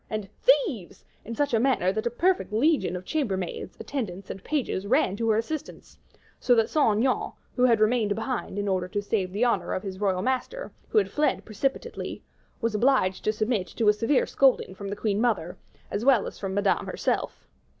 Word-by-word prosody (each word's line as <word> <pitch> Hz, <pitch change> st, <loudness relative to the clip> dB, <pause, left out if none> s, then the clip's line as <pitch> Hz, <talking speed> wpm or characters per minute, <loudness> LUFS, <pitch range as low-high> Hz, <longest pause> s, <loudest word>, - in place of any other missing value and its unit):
and 215 Hz, -2 st, -3 dB
"Thieves!" 350 Hz, -, +1 dB, 0.2 s
in 230 Hz, -, -6 dB
such 285 Hz, +1 st, 0 dB
a 225 Hz, -, +4 dB
manner 235 Hz, -7 st, +2 dB
that 215 Hz, +3 st, -2 dB
a -, -, +2 dB
perfect 355 Hz, -, +1 dB
legion 255 Hz, -, +2 dB
of 180 Hz, 0 st, -6 dB
chamber 265 Hz, -12 st, -1 dB
maids, 185 Hz, 0 st, -5 dB
attendants, 200 Hz, -9 st, -5 dB
and 195 Hz, -, -9 dB
pages, 260 Hz, -9 st, -2 dB
ran 255 Hz, -4 st, +2 dB
to 225 Hz, +2 st, -1 dB
her 215 Hz, -, +3 dB
assistance; 280 Hz, +7 st, -5 dB, 0.4 s
so 245 Hz, -, +4 dB
that 225 Hz, 0 st, +2 dB
Saint 225 Hz, -9 st, +3 dB
Aignan, 255 Hz, +3 st, 0 dB, 0.2 s
who 250 Hz, -, +4 dB
had 230 Hz, -3 st, +4 dB
remained 215 Hz, -1 st, +2 dB
behind 225 Hz, -2 st, -3 dB
in 205 Hz, 0 st, -1 dB
order 185 Hz, -2 st, 0 dB
to 205 Hz, -, -2 dB
save 200 Hz, -2 st, -1 dB
the 210 Hz, +6 st, +1 dB
honor 240 Hz, -, 0 dB
of 185 Hz, -, -4 dB
his 190 Hz, -2 st, -6 dB
royal 190 Hz, -2 st, +1 dB
master, 260 Hz, -, -2 dB, 0.2 s
who -, -, -1 dB
had 425 Hz, -, +3 dB
fled 300 Hz, 0 st, 0 dB
precipitately, 270 Hz, -, -3 dB, 0.4 s
was 230 Hz, -1 st, 0 dB
obliged 210 Hz, -5 st, +2 dB
to 215 Hz, -, +3 dB
submit 215 Hz, -3 st, -1 dB
to 225 Hz, -3 st, +1 dB
a -, -, +6 dB
severe 230 Hz, +6 st, +2 dB
scolding 265 Hz, -8 st, +2 dB
from 200 Hz, +1 st, -7 dB
the 200 Hz, -, -3 dB
queen 210 Hz, 0 st, -1 dB
mother, 195 Hz, -7 st, 0 dB, 0.4 s
as 205 Hz, -, -2 dB
well 260 Hz, -4 st, +4 dB
as -, -, -8 dB
from 195 Hz, -1 st, -3 dB
Madame 205 Hz, -1 st, +1 dB
herself. -, -, -2 dB
220 Hz, 200 wpm, -26 LUFS, 200-260 Hz, 0.4 s, a